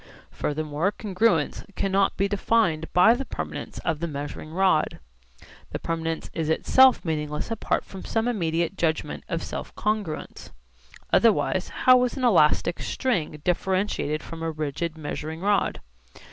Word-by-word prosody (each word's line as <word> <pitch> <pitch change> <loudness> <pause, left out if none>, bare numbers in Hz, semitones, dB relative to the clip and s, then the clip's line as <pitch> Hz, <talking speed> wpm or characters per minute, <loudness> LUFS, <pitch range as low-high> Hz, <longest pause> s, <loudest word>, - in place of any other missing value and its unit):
Furthermore 155 +4 -1
congruence 200 -6 0
cannot 195 0 +1
be 195 - +2
defined 195 -6 +1
by 180 +6 +6
the 255 +3 -2
permanence - - -6
of 160 -3 0
the 170 - -2
measuring 145 +1 -6
rod. 185 -2 +2 0.7
The - - -4
permanence 165 -1 -3
is 160 -1 -2
itself 260 +10 +5
meaningless 150 +2 -3
apart 225 - -1
from 190 - -9
some 225 +1 -1
immediate 170 -5 0
judgment 160 -2 -1
of 170 -2 -2
self - - -6
congruence. 210 -7 -3 0.6
Otherwise 205 -4 +3 0.2
how 255 -1 +7
is 250 +2 -2
an 260 - -3
elastic 170 -5 +3
string 165 - -2
differentiated 180 -4 0
from 165 -1 -8
a 165 - -1
rigid 155 +1 -3
measuring 155 +1 -5
rod? 205 +1 +1
170 Hz, 135 wpm, -25 LUFS, 155-205 Hz, 0.7 s, how